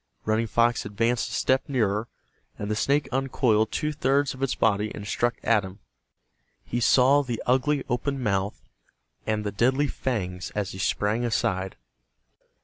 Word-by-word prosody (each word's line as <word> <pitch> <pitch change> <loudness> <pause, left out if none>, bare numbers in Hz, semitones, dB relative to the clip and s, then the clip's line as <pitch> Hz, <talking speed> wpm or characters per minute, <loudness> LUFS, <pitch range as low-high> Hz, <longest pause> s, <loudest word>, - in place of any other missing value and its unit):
Running 110 +1 +1
Fox 115 +2 +2
advanced 115 +4 0
a - - -7
step 130 +2 +1
nearer, 110 -4 0 0.5
and 105 +1 -4
the - - +1
snake 140 +4 +1
uncoiled 125 -5 +1
two 150 0 -1
thirds 140 0 +1
of 130 - -11
its 135 -2 0
body 105 -1 +1
and 105 - -7
struck 120 +4 0
at 110 -3 +3
him. 95 +1 -9 0.9
He 120 - -2
saw 130 +4 +5
the 120 -5 -4
ugly 130 +3 +2
open 135 +2 -1
mouth 100 -4 -1 0.6
and 110 -1 0
the 105 - -2
deadly 130 +8 +2
fangs 95 -10 -3
as 105 -2 -2
he 95 - -8
sprang 105 +4 0
aside. 95 -5 -1
115 Hz, 155 wpm, -26 LUFS, 105-130 Hz, 0.9 s, saw